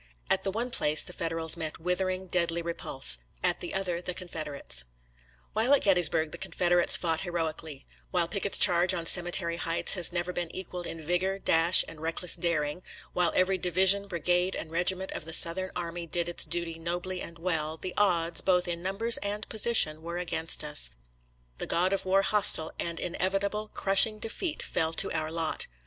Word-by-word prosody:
At 190 - +2
the - - -2
one 235 +5 -4
place 150 -8 +2
the - - -8
Federals 165 -1 -2
met 160 -2 -6
withering, 185 +2 -2
deadly 170 -2 -1
repulse 65 - +3
— - - -33
at - - +1
the 175 - -7
other, 180 -3 -2
the 180 0 -5
Con 185 - -7
federates. 145 - -5 0.7
While 235 +6 +3
at - - -2
Gettysburg 170 -5 +3
the 170 - -8
Confederates 175 -1 +2
fought 165 -2 -1
heroically; 160 -5 -4 0.2
while 175 -2 0
Pickett's 200 +2 -1
charge 180 0 +4
on 170 -2 -5
Cemetery 175 -1 +3
Heights 165 -1 +2
has 180 -3 +3
never 175 +1 -3
been 175 -2 -4
equaled 180 -1 -6
in 165 -1 -7
vigor, 180 +4 -1
dash, 170 -2 +4
and 155 - -12
reckless 165 +2 +1
daring; 160 -1 -2 0.3
while 175 -2 +1
every 185 +1 +2
division, 190 +3 +4
bri 170 -4 -6
gade, 180 +2 +1
and 160 - -7
regiment 180 +3 0
of - - -6
the 160 - -7
Southern 180 +3 +3
army 170 -1 -5
did 170 +1 0
its 175 - -2
duty 170 -1 -2
nobly 175 +2 -4
and 170 - -9
well, 160 -2 -3
the 185 +2 -6
odds, 170 -4 +1
both 180 -1 +1
in 170 -1 -4
numbers 200 +6 +1
and 205 +1 -5
position, 210 -9 +4
were 170 +1 -6
against 165 -3 -1
us 150 - +1 0.4
— - - -38
^the - - -4
God 185 +3 +1
of 195 - +1
War 195 +1 +2
hostile, 200 -7 +3
and 170 -1 -3
inevitable, 195 +4 -2
crushing 200 +3 +4
defeat 300 - -4
fell 160 -1 -2
to - - +1
our 155 0 -3
lot. 165 -1 -2
175 Hz, 190 wpm, -28 LUFS, 165-185 Hz, 0.7 s, charge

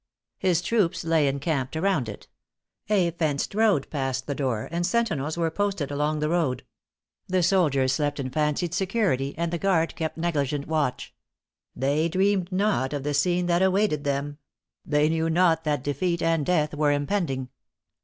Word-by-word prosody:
His 180 -2 +1
troops 190 -4 +1
lay 160 -3 +2
encamped 140 0 -1
around 160 - 0
it. 100 - -9 0.6
A 190 -5 +3
fenced 155 -3 -1
road 210 -9 +2
passed 135 -3 -2
the 145 - -2
door, 130 -6 -2
and 170 +1 -1
sentinels 175 -7 0
were 165 -1 0
posted 195 -6 -1
along 150 +2 0
the 150 - 0
road. 160 -7 0 0.6
The 185 -1 +1
soldiers 150 -8 +2
slept 145 -1 -1
in 130 -2 -3
fancied 155 +4 0
security, 185 - 0
and 170 0 -2
the 170 - -1
guard 170 -4 +1
kept 160 -1 -3
negligent 145 -4 -1
watch; 150 -5 -1 0.6
they 145 +5 +1
dreamed 190 +1 +1
not 185 -8 0
of 145 -2 -3
the 145 +1 -1
scene 175 +5 +1
that 175 0 +2
awaited 190 -5 +2
them; 145 +1 -2 0.4
they 150 0 +2
knew 160 +1 0
not 165 -1 +2
that 150 -4 0
defeat 170 +5 -1
and 165 -3 +1
death 155 -4 +1
were 150 -1 +2
impending. 145 -3 -1
160 Hz, 165 wpm, -25 LUFS, 145-180 Hz, 0.6 s, A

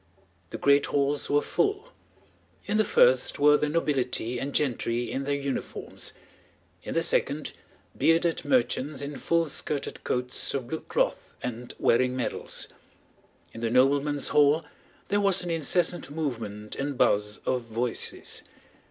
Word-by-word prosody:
The - - -5
great 140 0 +4
halls 145 0 0
were 145 0 +3
full. 410 +3 0 0.8
In 210 +1 0
the 215 - +4
first 130 -9 +4
were 150 +1 +6
the 150 0 +1
nobility 130 -6 0
and 140 +3 -3
gentry 120 -4 0
in 135 +1 -3
their 145 0 0
uniforms, 140 -1 -4 0.7
in - - -6
the - - +2
second - - 0 0.4
bearded 165 +1 +2
merchants 135 +1 0
in 145 +1 -5
full 170 0 +1
skirted 145 -1 -3
coats 125 +2 -1
of 130 -3 -3
blue 160 - -2
cloth - - -2
and 125 0 -5
wearing 125 +2 +2
medals. 130 - -2 0.8
In 115 - -8
the 115 - 0
noblemen's 140 +3 +3
hall 150 +2 +4 0.4
there 205 +1 +2
was 195 -2 +3
an 175 - -3
incessant 165 +1 +1
movement 115 -9 -4
and 140 -1 -3
buzz 105 -1 +2
of 130 -1 +1
voices. 115 +1 -2
140 Hz, 140 wpm, -27 LUFS, 125-155 Hz, 0.8 s, were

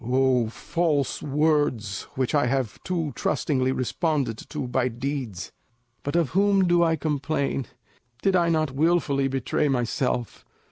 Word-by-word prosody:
O 125 -1 +2
false 150 +1 -1
words 145 -8 0
which 130 +1 -1
I 145 -4 +3
have 130 -4 -1
too 165 -5 -2
trustingly 130 -3 0
responded 135 -2 -1
to 150 -4 -4
by 125 0 +1
deeds! 125 -5 -4 0.5
But 145 - -3
of 170 -5 +2
whom 195 0 +3
do 175 0 +4
I 165 -1 +3
complain? 140 -3 -1 0.6
Did 195 -1 +3
I 170 -2 +3
not 155 -3 +1
wilfully 145 -2 +2
betray 135 +3 0
myself? 125 -2 -1
140 Hz, 135 wpm, -25 LUFS, 130-160 Hz, 0.6 s, do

